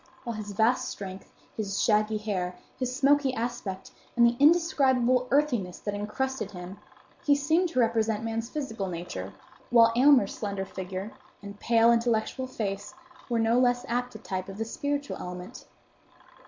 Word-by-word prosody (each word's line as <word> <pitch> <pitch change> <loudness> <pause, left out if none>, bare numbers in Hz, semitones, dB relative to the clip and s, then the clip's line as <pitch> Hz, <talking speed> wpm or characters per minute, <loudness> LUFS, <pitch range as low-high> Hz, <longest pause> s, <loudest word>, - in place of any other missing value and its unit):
With 235 -2 -4
his 210 -1 -6
vast 225 +5 +2
strength, 190 -1 -8 0.2
his 200 -2 -2
shaggy 215 0 +2
hair, 190 -4 -3 0.2
his 255 -1 -2
smoky 280 -1 +3
aspect, 225 -5 -4 0.2
and 235 -1 +6
the 235 0 +3
indescribable 270 -6 +4
earthiness 245 -10 +1
that 205 - -4
incrusted 260 +6 -3
him, 185 +1 -9 0.4
he 290 -4 +4
seemed 320 +5 +2
to 310 - -1
represent 225 -2 +1
man's 225 0 -3
physical 225 -10 -4
nature; 165 - -5 0.4
while 230 -1 +6
Aylmer's 255 -5 +5
slender 200 -2 -3
figure, 190 +2 -6 0.3
and 200 0 -9
pale, 230 0 +4
intellectual 235 +2 0
face, 205 -5 -4 0.3
were 235 - +1
no 225 +2 +3
less 245 -1 +2
apt 245 0 -2
a - - -4
type 190 -3 -5
of 195 - -8
the 225 - -2
spiritual 285 +4 -3
element. 180 0 -8
230 Hz, 155 wpm, -28 LUFS, 200-255 Hz, 0.4 s, and